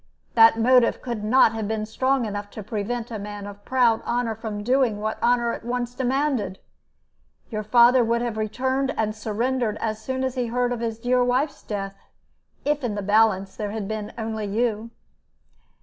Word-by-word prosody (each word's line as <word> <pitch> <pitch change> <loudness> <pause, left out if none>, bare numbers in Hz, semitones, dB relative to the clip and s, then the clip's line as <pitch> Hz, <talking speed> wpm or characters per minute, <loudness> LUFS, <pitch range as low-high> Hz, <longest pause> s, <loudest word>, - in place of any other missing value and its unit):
That 225 0 +7
motive 245 +1 +4
could 235 -4 -4
not 225 +1 +5
have 220 -2 -3
been 215 0 -2
strong 260 +3 0
enough 205 -1 -5
to 215 - -5
prevent 225 +3 -4
a 220 - -4
man 205 0 -7
of 205 0 -10
proud 240 -3 +2
honor 240 -1 -1
from 215 -2 -5
doing 245 -3 +2
what 215 +1 -3
honor 240 -1 +2
at - - -7
once 240 0 -3
demanded. 260 -6 -1 0.9
Your 215 -1 -2
father 240 +3 +5
would 235 +1 +1
have 235 -2 -2
returned 260 +5 -1
and 215 -1 0
surrendered 220 +1 -1
as 215 -1 -3
soon 260 +3 -3
as 260 -1 -1
he 250 -2 -1
heard 245 +1 0
of 240 - -4
his 225 -1 -3
dear 245 +2 +2
wife's 255 +4 0
death, 195 -2 -5 0.7
if 295 -1 0
in 225 -4 -1
the 205 - -3
balance 205 -2 +2
there 210 -2 -3
had 210 -1 -4
been 215 -1 -4
only 220 -2 -3
you." 225 +1 -1
225 Hz, 180 wpm, -24 LUFS, 215-245 Hz, 0.9 s, That